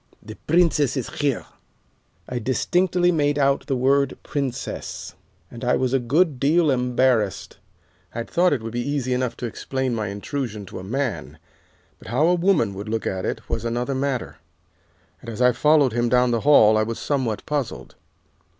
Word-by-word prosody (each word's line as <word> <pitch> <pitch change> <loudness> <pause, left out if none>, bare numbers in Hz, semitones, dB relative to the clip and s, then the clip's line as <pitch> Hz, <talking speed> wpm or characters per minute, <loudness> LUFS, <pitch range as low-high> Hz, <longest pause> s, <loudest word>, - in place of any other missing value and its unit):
The 110 - -9
Princess 155 -4 +3
is 130 - -4
here.' 140 -5 -1 0.8
"I 125 - -3
distinctly 175 +9 +1
made 145 -3 +1
out 140 -1 +1
the 135 - 0
word 135 +2 +2
'princess,' 135 -4 -4 0.4
and 120 - -10
I 125 - +2
was 130 0 0
a 135 - +3
good 140 +3 +1
deal 155 +3 +3
embarrassed. 125 -4 0 0.6
I 115 - -2
had 115 - -9
thought 180 +1 +3
it 125 -6 -1
would 115 - -5
be 120 - -1
easy 135 -1 -1
enough 125 -1 -2
to 120 - -5
explain 130 +2 -3
my 110 -2 -2
intrusion 105 +1 -5
to 90 - -8
a - - -8
man, 125 +3 -3 0.6
but - - -14
how 125 +7 +2
a 175 - +4
woman 175 - +2
would 100 +3 -7
look 110 0 -2
at 95 -1 -2
it - - -4
was - - -3
another 120 +3 -2
matter, 130 - -2 0.8
and - - -9
as 110 - -7
I 125 0 +5
followed 150 -2 +3
him 120 0 +1
down 125 0 +3
the 115 -1 0
hall 110 -7 +6
I - - +3
was 115 +1 -2
somewhat 130 -7 -2
puzzled. 145 -4 -3
130 Hz, 180 wpm, -23 LUFS, 115-145 Hz, 0.8 s, hall